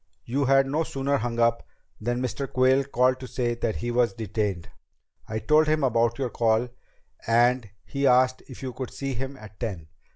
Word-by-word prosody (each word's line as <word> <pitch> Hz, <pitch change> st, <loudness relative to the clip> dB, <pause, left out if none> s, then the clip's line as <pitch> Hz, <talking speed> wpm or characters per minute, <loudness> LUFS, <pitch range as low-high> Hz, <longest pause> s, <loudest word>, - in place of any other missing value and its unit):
"You 135 Hz, +4 st, 0 dB
had 135 Hz, +1 st, +5 dB
no 145 Hz, +4 st, 0 dB
sooner 140 Hz, -1 st, -1 dB
hung 115 Hz, -1 st, -3 dB
up 115 Hz, 0 st, +3 dB, 0.4 s
than 120 Hz, +3 st, -2 dB
Mr. 130 Hz, +2 st, -3 dB
Quayle 130 Hz, +1 st, +3 dB
called 130 Hz, -1 st, +2 dB
to 130 Hz, -, -7 dB
say 120 Hz, -2 st, -1 dB
that 115 Hz, -2 st, -2 dB
he 120 Hz, 0 st, -3 dB
was 120 Hz, 0 st, +2 dB
detained. 105 Hz, -5 st, -2 dB, 0.6 s
I 110 Hz, -, -3 dB
told 155 Hz, +6 st, +3 dB
him 155 Hz, -1 st, +2 dB
about 120 Hz, -2 st, +2 dB
your 130 Hz, -3 st, -2 dB
call 115 Hz, +1 st, +1 dB, 0.6 s
and 120 Hz, 0 st, +3 dB, 0.2 s
he 140 Hz, 0 st, 0 dB
asked 130 Hz, 0 st, +4 dB
if 130 Hz, 0 st, -11 dB
you 130 Hz, -1 st, -4 dB
could 125 Hz, 0 st, -5 dB
see 135 Hz, -1 st, -4 dB
him 135 Hz, +3 st, -5 dB
at 110 Hz, -3 st, -13 dB
ten." 90 Hz, -9 st, -5 dB
125 Hz, 190 wpm, -26 LUFS, 115-135 Hz, 0.6 s, had